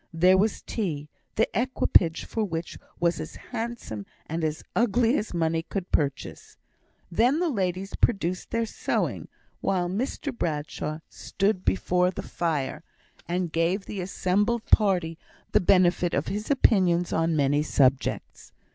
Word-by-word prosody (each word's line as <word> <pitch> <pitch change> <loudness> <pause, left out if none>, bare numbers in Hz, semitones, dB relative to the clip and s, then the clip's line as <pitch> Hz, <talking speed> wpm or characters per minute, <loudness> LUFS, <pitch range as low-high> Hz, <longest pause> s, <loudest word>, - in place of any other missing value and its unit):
There 180 +3 +5
was 205 +3 +1
tea, 150 -9 -3 0.3
the - - +3
equipage 205 -8 +2
for 225 - -2
which 165 -4 -4 0.2
was 170 0 +1
as - - -6
handsome 225 - -6 0.2
and 165 +1 -3
as 155 0 -2
ugly 235 +2 +3
as 215 - -2
money 165 -1 0
could 180 +2 -5
purchase. 140 -3 -2 0.5
Then 245 - +3
the 350 -1 +1
ladies 190 -3 -2
produced 185 -5 0
their 230 0 0
sewing, - - -2 0.3
while 180 -2 0
Mr 250 +7 -3
Bradshaw 155 -3 -3
stood 195 -1 -1
before 180 - +2
the 185 - -5
fire, 155 -6 -2 0.4
and 175 -1 -1
gave 170 +5 0
the 200 - -5
assembled 205 +5 0
party 180 -6 +2 0.3
the - - +4
benefit 180 -1 +3
of - - -1
his 210 +2 -4
opinions 185 -10 +3
on 165 0 +1
many 145 0 +2
subjects. 135 -3 0
180 Hz, 140 wpm, -26 LUFS, 165-210 Hz, 0.5 s, There